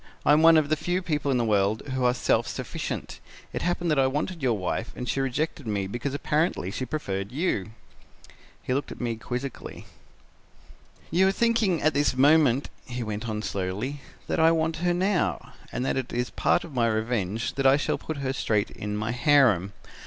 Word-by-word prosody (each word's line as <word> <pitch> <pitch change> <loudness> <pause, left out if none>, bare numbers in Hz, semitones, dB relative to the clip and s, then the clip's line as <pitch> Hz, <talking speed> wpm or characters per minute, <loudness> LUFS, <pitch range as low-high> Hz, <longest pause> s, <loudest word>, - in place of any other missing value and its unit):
I - - +6
am 150 - +5
one 165 0 +7
of 150 -2 +2
the 155 - +3
few 175 +4 -2
people 150 -4 -1
in 130 - +2
the 120 - +1
world 105 0 +1
who 130 -1 -1
are 125 - +4
self - - +1
sufficient. - - -5 0.3
It - - -3
happened 175 -1 0
that 150 - +2
I 135 - +4
wanted 150 +5 -3
your 120 -5 +1
wife 95 +4 -3
and 125 - -5
she 135 - -1
rejected 135 0 -2
me 100 -2 -1
because 120 +8 -4
apparently 150 - 0
she 130 +5 -4
preferred 100 -9 -3
you.' 130 - -1 0.9
"He 125 - -1
looked 140 +2 -2
at - - -9
me 120 -2 -2
quizzically. 125 +4 -6 1.3
"'You 190 +3 +4
are - - +4
thinking 220 -5 +1
at 155 - +3
this 140 -2 +1
moment,' 140 -2 +4 0.2
he 125 0 -4
went 110 +1 -4
on 105 0 -3
slowly, 100 +10 -3 0.2
'that - - -1
I 160 0 +6
want 160 0 0
her 175 +1 +1
now, 190 +1 0 0.2
and 125 - -2
that 135 - 0
it 130 -2 -3
is 120 0 -2
part - - +2
of 165 - -10
my 120 -2 +2
revenge 110 -1 -1
that 135 0 +2
I 135 +1 +6
shall 145 - -1
put 160 - -5
her 130 - 0
straight 105 -6 0
in 105 0 -4
my 110 +2 -2
harem. 120 - +3
130 Hz, 200 wpm, -26 LUFS, 115-155 Hz, 1.3 s, one